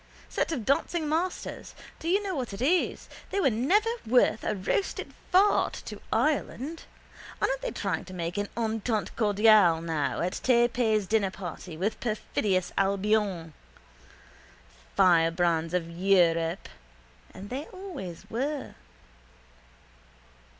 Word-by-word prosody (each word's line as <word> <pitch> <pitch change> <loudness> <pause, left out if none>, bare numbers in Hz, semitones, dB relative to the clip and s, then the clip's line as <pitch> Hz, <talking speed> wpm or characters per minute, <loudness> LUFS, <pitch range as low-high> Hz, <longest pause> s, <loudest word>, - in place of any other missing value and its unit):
Set - - -1
of 250 -9 -3
dancing 310 +3 +1
masters! 335 +4 -3 0.2
Do 330 - -3
you 395 +3 +2
know 390 -2 -2
what 250 -7 -3
it 195 - -7
is? 350 +6 +1 0.2
They 400 - -1
were 275 -9 +3
never 370 - +2 0.2
worth 240 -1 +3
a 215 - -1
roasted 200 - -2 0.2
fart 390 +3 +4
to - - -8
Ireland. 305 +1 -1 0.5
Aren't - - 0
they - - -2
trying - - -3
to 185 - -10
make 170 0 -3
an 205 - -2
Entente 220 -2 -1
cordiale 210 -5 +5
now 160 -3 -2
at 180 +2 -2
Tay 240 -2 +4
Pay's 220 -4 +1
dinnerparty 190 -5 -2
with 200 +6 -1
perfidious 210 -4 -1
Albion? 195 -4 +1 1.4
Firebrands 165 -1 +3
of 170 -2 -1
Europe 170 -1 +2 0.6
and 200 +3 -10
they 275 +4 -3
always 315 - -8
were. 275 +5 -3
215 Hz, 120 wpm, -28 LUFS, 180-280 Hz, 1.4 s, cordiale